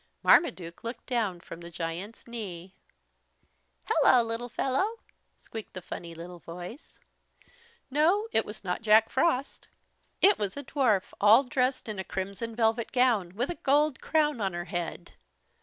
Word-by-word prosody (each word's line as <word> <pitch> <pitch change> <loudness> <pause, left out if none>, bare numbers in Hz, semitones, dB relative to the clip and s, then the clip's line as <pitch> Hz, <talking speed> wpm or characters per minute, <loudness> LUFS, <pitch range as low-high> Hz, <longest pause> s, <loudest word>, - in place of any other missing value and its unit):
Marmaduke 175 - +3
looked 230 +2 -6
down 220 -8 -1
from 165 0 -10
the 170 - -9
giant's 175 +5 -6
knee. 195 -6 -7 1.1
"Hello, 245 -2 +5
little 230 +2 -4
fellow," 325 - 0 0.4
squeaked 220 -2 -9
the 185 - -5
funny 170 -1 -7
little 175 +1 -9
voice. 175 - -10 0.9
No, 345 +10 +3
it 225 - +3
was 210 0 -9
not 180 +1 -2
Jack 220 0 +5
Frost. 275 -1 0 0.5
It 405 +1 +5
was 200 +2 -2
a 285 - -5
dwarf, 245 -8 +1
all 215 +6 +7
dressed 255 0 0
in 210 -3 -5
a - - -2
crimson 200 +5 -5
velvet 225 0 +1
gown, 230 -9 +2
with 245 +9 -1
a - - -4
gold 290 0 +2
crown 300 -6 +1
on 195 -3 0
her 175 0 -4
head. 175 -1 -5
225 Hz, 150 wpm, -28 LUFS, 185-260 Hz, 1.1 s, all